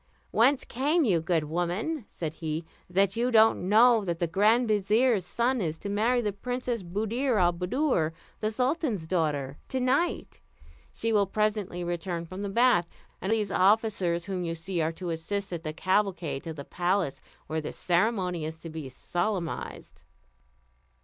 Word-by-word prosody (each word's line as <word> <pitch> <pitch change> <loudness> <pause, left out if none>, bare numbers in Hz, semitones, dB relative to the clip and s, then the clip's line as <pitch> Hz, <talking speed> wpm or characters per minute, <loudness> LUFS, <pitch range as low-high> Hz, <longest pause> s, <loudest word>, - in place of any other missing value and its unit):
"Whence 255 +4 +3
came 295 +6 +1
you, 180 -8 +2
good 165 -1 +1
woman," 175 - -2
said 155 -3 -5
he, 160 0 -4 0.2
"that 195 +2 +2
you 240 +2 +1
don't 220 -5 +4
know 225 +1 +6
that 170 -3 -2
the 170 - 0
grand 215 +8 +3
vizier's 215 +1 +3
son 240 +3 0
is 160 -3 -2
to 200 - -6
marry 230 +5 +2
the 210 -3 -1
Princess 245 +1 -3
Buddir 220 +7 -1
al 175 -1 +4
Buddoor, 180 - 0 0.3
the 215 - 0
sultan's 250 - -1
daughter, 150 -5 -1
to 260 - -1
night? 265 +7 0 0.5
She 230 0 -2
will 200 -2 +3
presently 205 -3 -1
return 175 0 -3
from 185 +3 -7
the 200 - -3
bath; 230 -5 +3 0.3
and 190 - -1
these 215 -3 +1
officers 190 -4 +2
whom 185 -2 -3
you 165 -1 -2
see 170 +1 -3
are 160 +1 +1
to 175 0 -5
assist 190 +4 -3
at 170 - -4
the 155 -2 -4
cavalcade 185 -4 0
to 165 - -4
the 140 -2 -8
palace, 180 -4 -1 0.2
where 160 0 -2
the - - -5
ceremony 180 -2 0
is 160 +1 -4
to 165 0 -10
be 155 -4 -6
solemnised." 175 +6 -4
195 Hz, 165 wpm, -28 LUFS, 170-225 Hz, 0.5 s, know